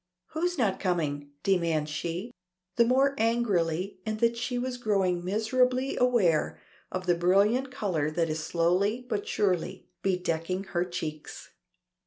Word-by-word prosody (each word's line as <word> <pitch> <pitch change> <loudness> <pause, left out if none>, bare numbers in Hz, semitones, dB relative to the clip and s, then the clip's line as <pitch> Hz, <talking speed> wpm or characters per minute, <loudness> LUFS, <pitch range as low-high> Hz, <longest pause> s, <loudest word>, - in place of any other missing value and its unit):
"Who's 350 +2 -1
not 215 -7 +1
coming?" 150 -6 -1
demands 165 -5 +1
she, 170 +8 -4 0.4
the 235 - +5
more 265 +3 +3
angrily 200 -6 0
in 215 +1 -2
that 235 +1 +2
she 245 +2 -3
is 250 0 -2
growing 195 -6 +1
miserably 250 +7 +1
aware 225 -11 +2 0.3
of 185 0 -3
the 175 - +4
brilliant 200 +9 +3
color 185 - -1
that 165 +1 0
is 155 0 -3
slowly 185 +9 +1
but 210 -4 -2
surely 185 -2 -1
bedecking 180 0 -1
her 175 -1 0
cheeks. 160 -4 -6
190 Hz, 135 wpm, -28 LUFS, 170-235 Hz, 0.4 s, the